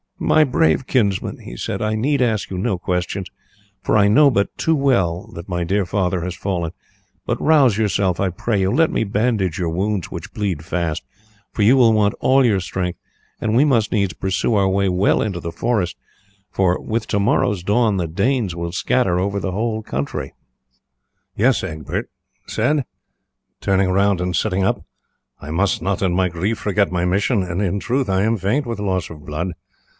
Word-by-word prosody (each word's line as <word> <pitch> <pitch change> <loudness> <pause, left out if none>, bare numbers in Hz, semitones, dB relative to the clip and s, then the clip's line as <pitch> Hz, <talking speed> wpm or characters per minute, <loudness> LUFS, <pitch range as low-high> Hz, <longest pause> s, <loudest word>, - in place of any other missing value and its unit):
"My 155 - +4
brave 125 - +1
kinsman," 100 -7 0
he - - -9
said, - - -3
"I 110 0 0
need 135 +5 +1
ask 110 -4 0
you 95 - -5
no 100 0 0
questions, 90 +2 -2 0.5
for - - +2
I 100 -1 +5
know 140 +8 +6
but 100 -4 0
too 160 - +2
well 95 - +1
that 85 +3 -9
my 90 -1 -1
dear 95 +3 0
father 90 -2 -1
has 90 0 -4
fallen; 85 -4 -2 0.5
but - - -2
rouse 140 -9 +4
yourself, 100 -4 +1
I 95 - +1
pray 100 +3 -1
you; 95 +1 +1
let 165 +5 +3
me - - 0
bandage 105 -4 0
your 85 -2 0
wounds, 95 +2 -1
which - - -7
bleed 95 -7 -2
fast, 85 -3 -2 0.5
for 105 - -1
you 115 +6 +6
will 120 -4 +5
want 105 -1 +2
all 130 0 +4
your 105 -5 +3
strength, 90 -1 -3 0.4
and 110 0 0
we 135 +5 +5
must 115 -7 +2
needs 100 -6 +1
pursue 95 +6 -1
our 100 -2 +3
way 100 0 +1
well 90 +2 +2
into 95 -5 -2
the 85 -1 -5
forest, 90 -1 -1 0.6
for 90 -2 +1
with 110 0 -3
to 100 - 0
morrow's 100 -1 +1
dawn 105 +1 +2
the 85 -3 -1
Danes 100 +2 0
will 85 0 -4
scatter 90 0 +1
over 100 +2 -1
the 95 - -3
whole 110 +2 -2
country." 70 -6 -4 1.0
"Yes," 120 +3 +2
Egbert 75 -5 -4 0.4
said, 135 +5 0 0.7
turning 95 -1 +1
round 100 0 +2
and 90 -1 -1
sitting 95 +3 0
up, 95 - 0 0.6
"I 75 - -8
must 95 +3 +1
not 95 +2 -1
in 95 -3 +1
my 90 0 +2
grief 95 +6 -2
forget 100 -1 +1
my 90 -1 0
mission, 100 +4 +1
and 90 +1 -3
in 100 0 0
truth 125 +2 -1
I 95 0 +2
am 110 +1 +1
faint 110 +10 0
with 115 -2 -4
loss 95 -5 -1
of 75 -3 -11
blood. 80 +4 -3
100 Hz, 190 wpm, -20 LUFS, 90-110 Hz, 1.0 s, know